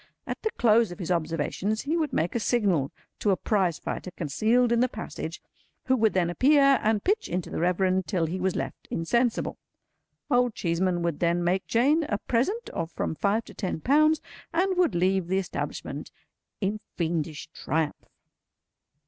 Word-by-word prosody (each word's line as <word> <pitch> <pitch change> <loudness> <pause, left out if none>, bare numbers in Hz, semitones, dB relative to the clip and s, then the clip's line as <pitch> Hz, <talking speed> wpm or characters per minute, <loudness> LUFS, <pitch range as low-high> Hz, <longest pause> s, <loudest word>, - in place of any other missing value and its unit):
At - - -5
the 440 - 0
close 230 -2 +4
of 175 - -7
his 180 -3 -4
observations 170 +6 -1
he 305 +4 -1
would 315 -4 0
make 165 +2 0
a 235 - 0
signal 200 - +1 0.3
to 210 - +1
a 190 - +3
Prizefighter 185 -3 -1
concealed 220 - +1
in 235 - +3
the 250 +1 +3
passage, - - -6 0.5
who 260 - +3
would 220 -3 +2
then 175 -2 +1
appear 275 +5 +5
and 215 -1 +1
pitch 425 +3 +1
into 180 -1 -3
the - - -3
Reverend, 185 +2 +1
till 180 -6 0
he 175 +4 -3
was 185 0 0
left - - -5
insensible. 235 +8 0 0.7
Old 245 -2 +3
Cheeseman 175 0 0
would 170 -3 -1
then 170 0 +1
make 185 +2 0
Jane 285 +8 +3
a 205 - +1
present 320 - -1
of 165 - -3
from - - -2
five 205 +7 0
to - - -12
ten 190 -5 -3
pounds, 305 - +4 0.3
and 375 +3 +1
would 360 - +2
leave 185 0 +2
the 190 +2 +1
establishment 195 - -4 0.5
in 205 +2 -1 0.2
fiendish 160 -3 -2
triumph. 155 -1 -2
195 Hz, 170 wpm, -27 LUFS, 175-245 Hz, 0.7 s, appear